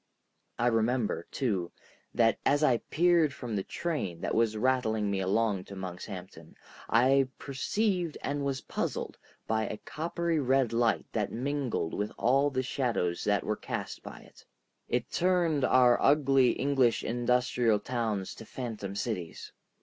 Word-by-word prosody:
I 120 - 0
remember, 115 -4 +1
too, 100 -10 -1 0.4
that 115 -1 +2
as 145 +2 +2
I 130 -5 +4
peered 165 -3 +3
from 120 -7 -5
the 100 - 0
train 100 - -3
that - - -2
was 110 -1 +2
rattling 110 -4 +1
me 100 - 0
along 100 0 0
to 100 - -9
Monkshampton, 90 -2 -8 0.3
I 130 +3 +4
perceived 175 +5 -1
and 145 0 -2
was 135 -1 -2
puzzled - - -4 0.3
by 110 0 0
a 105 - -5
coppery 165 +3 -2
red 130 -3 +2
light 115 -1 +2
that 105 -3 -1
mingled 130 - -2
with 105 +1 -2
all 135 +4 +3
the 130 -2 -1
shadows 120 -10 -1
that 105 -1 +2
were 105 - -1
cast - - -5
by - - -10
it. - - -18 0.5
It 120 0 -1
turned 170 -5 +2
our 125 -1 +5
ugly 135 -3 +4
English 130 -3 +2
industrial 120 -2 +1
towns 110 -4 -2
to 115 - -11
phantom 110 -6 -5
cities. 100 -5 -4
120 Hz, 145 wpm, -29 LUFS, 105-140 Hz, 0.5 s, our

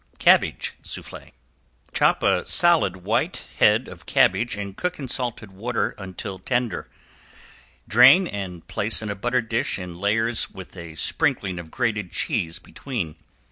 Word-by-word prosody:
~CABBAGE - - +3
SOUFFLE~ - - -8 0.6
Chop - - +3
a 90 - +3
solid 155 - +4
white 110 +3 0
head - - +4
of - - -12
cabbage 120 0 +3
and 100 -1 -5
cook 180 - -2
in 140 - -6
salted 120 -5 -3
water 115 +6 -2
until 95 0 -7
tender. 120 -2 -2 1.0
Drain 125 - +7
and 95 - -6
place 110 +2 -1
in 105 - -3
a - - -4
buttered 120 +3 -1
dish 115 +1 -1
in 90 -2 -8
layers 115 +4 +1
with 95 0 -11
a 85 -3 -9
sprinkling 90 +3 0
of 85 -2 -9
grated 105 -4 -1
cheese 80 0 -2
between. 105 - -5
105 Hz, 140 wpm, -24 LUFS, 95-120 Hz, 1.0 s, Drain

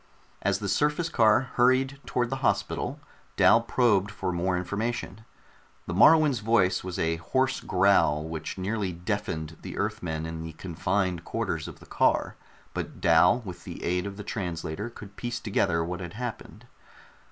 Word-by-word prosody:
As 100 -1 +1
the 100 -1 -4
surface 150 - +1
car 110 -4 +4
hurried 130 +2 +3
toward 120 0 0
the 135 - -1
hospital, - - 0 0.4
Dal - - +6
probed 105 -6 +2
for 95 -2 -3
more 90 +1 0
information. 110 +3 -3 0.6
The 85 - -4
Moruan's 150 - +6
voice 105 -4 +2
was 90 -1 -5
a 80 0 0
hoarse 130 +10 0
growl 90 -6 +3
which 80 +1 -5
nearly 100 0 -2
deafened 85 -3 -4
the - - -7
Earthmen 80 -2 -2
in 80 0 -5
the 80 0 -7
confined 90 +1 -1
quarters - - -3
of - - -10
the - - -15
car - - +1 0.4
but - - -5
Dal 90 +8 +5
with 90 -3 -8
the - - -8
aid 90 +2 0
of 100 0 -7
the 105 - -6
translator 90 0 -4
could 105 -3 -12
piece 120 0 -3
together 85 -5 +1
what 90 +1 -4
had 90 0 -7
happened. 120 +1 -7
95 Hz, 160 wpm, -27 LUFS, 85-115 Hz, 0.6 s, Dal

